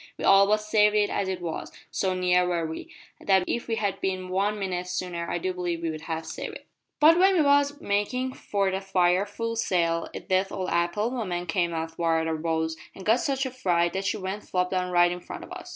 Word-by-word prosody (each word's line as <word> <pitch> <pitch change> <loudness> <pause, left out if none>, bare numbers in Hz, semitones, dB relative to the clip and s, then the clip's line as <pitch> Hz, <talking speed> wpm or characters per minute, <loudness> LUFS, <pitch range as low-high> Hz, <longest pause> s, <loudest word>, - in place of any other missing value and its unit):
We - - -4
all 195 0 +7
but 210 +1 +4
saved 210 0 +3
it 210 -1 +2
as 200 - -1
it 185 -1 -3
was 165 -2 -5 0.2
so 190 -1 0
near 180 0 +3
were 170 -2 0
we, 160 0 -7 0.3
that 190 -2 +3
if 235 - -2
we 225 - 0
had 205 -3 -2
bin 185 -1 -2
one 200 +3 0
minute 180 -3 -3
sooner 180 -1 -3
I - - -1
do 185 +2 -2
believe 175 -2 -3
we'd 160 -2 -3
have 160 0 -4
saved 160 - -6
it. - - -11 0.3
"`But 320 +3 +7
when 380 +1 +5
we 325 - +4
was 285 0 +3
makin' 250 +4 -1
for 200 -5 -1
that 190 +1 -3
fire 185 0 +2
full 230 +2 -4
sail, 170 -6 0
a - - -3
deaf 190 +1 0
old 185 -1 -3
apple 175 +7 0
woman 185 -8 -3
came 170 0 0
athwart 165 0 -1
our 160 0 -1
bows 160 0 -1 0.2
an 190 - -9
got 225 +5 +3
such 270 0 0
a 260 - -3
fright 175 -9 +1
that 190 +1 -2
she 190 - 0
went 195 +1 -4
flop 180 -2 -1
down 185 -1 0
right 175 0 +4
in 180 - -4
front - - -8
of - - -12
us. - - -8
185 Hz, 230 wpm, -26 LUFS, 175-210 Hz, 0.3 s, all